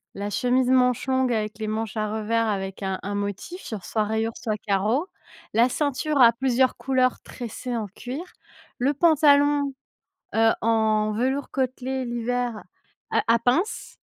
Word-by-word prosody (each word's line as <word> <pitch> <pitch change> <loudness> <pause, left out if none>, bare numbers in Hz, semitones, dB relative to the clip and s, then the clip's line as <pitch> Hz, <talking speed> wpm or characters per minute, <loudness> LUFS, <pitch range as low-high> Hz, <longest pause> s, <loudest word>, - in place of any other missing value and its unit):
la 200 +1 -3
chemise 250 +4 +1
manche 250 -1 +3
longue 260 -1 +2
avec 215 -1 -2
les 215 - -3
manches 220 0 -3
à 215 0 -1
revers 225 +1 0
avec 195 -1 -3
un 190 -1 -2
un 200 +1 -3
motif 205 - -5
genre 215 -5 -6
soit 215 - 0
rayures 220 +2 -1
soit 215 -3 -3
carreaux, 210 - 0 0.5
la 235 +3 +4
ceinture 290 +2 -1
à 235 -1 +8
plusieurs 255 +1 +2
couleurs 255 0 +1
tressées 245 0 -6
en 215 - -3
cuir, 250 - -7 0.5
le 275 +4 +1
pantalon, 290 -2 +4 0.6
heu, 225 0 +5
en 215 -1 +2
velours 260 +6 -1
côtelé 260 0 -2
l'hiver 240 -1 -2 0.5
à - - +2
à - - +3
pince 255 - -1
240 Hz, 155 wpm, -24 LUFS, 215-260 Hz, 0.6 s, à